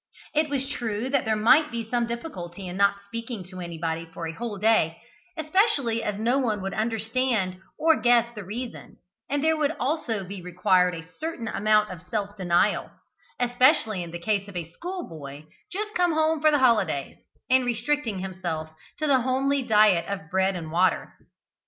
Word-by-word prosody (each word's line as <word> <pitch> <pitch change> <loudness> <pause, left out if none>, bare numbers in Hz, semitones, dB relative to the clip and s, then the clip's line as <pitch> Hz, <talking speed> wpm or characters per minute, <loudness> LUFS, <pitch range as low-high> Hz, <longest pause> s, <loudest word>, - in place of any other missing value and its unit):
It 305 0 +2
was 270 -1 -1
true 235 -3 -3
that 280 -2 +2
there 220 0 +2
might 265 +8 +5
be 230 -3 -4
some 240 0 0
difficulty 195 - -6
in 180 - -6
not 200 0 +2
speaking 230 0 -6
to 185 - -8
anybody 165 -1 -4
for 165 0 -6
a 165 - -3
whole 225 +1 -5
day, 210 -6 +2 0.4
especially 310 - +2
as 205 -1 -2
no 240 +5 +2
one 220 -6 0
would 195 - -3
understand 220 -3 0 0.2
or 320 0 +3
guess 240 -1 +4
the 210 -3 -7
reason, 235 +6 -7 0.3
and 285 0 0
there 320 0 +4
would 305 0 0
also 255 -7 -1
be 190 0 -7
required 180 0 +2
a 165 0 -9
certain 300 - -5
amount 210 0 +2
of 180 -3 -8
self 205 0 -2
denial 185 +1 +1 0.5
especially 245 - +3
in 170 - -6
the 170 - -5
case 200 +3 -1
of 200 - -11
a 170 -2 -5
schoolboy 165 - -7 0.3
just 425 +3 -4
come 355 -2 +2
home 315 0 +2
for 310 - +6
the 300 - +4
holidays 215 - +2 0.3
in 260 0 +4
restricting 240 -1 -1
himself 175 -4 -4 0.3
to 310 - -1
the 270 -4 +4
homely 270 +2 +1
diet 210 -7 +4
of 195 -4 -5
bread 190 +1 +2
and 160 -3 -6
water. 180 +3 +1
220 Hz, 175 wpm, -26 LUFS, 185-260 Hz, 0.5 s, for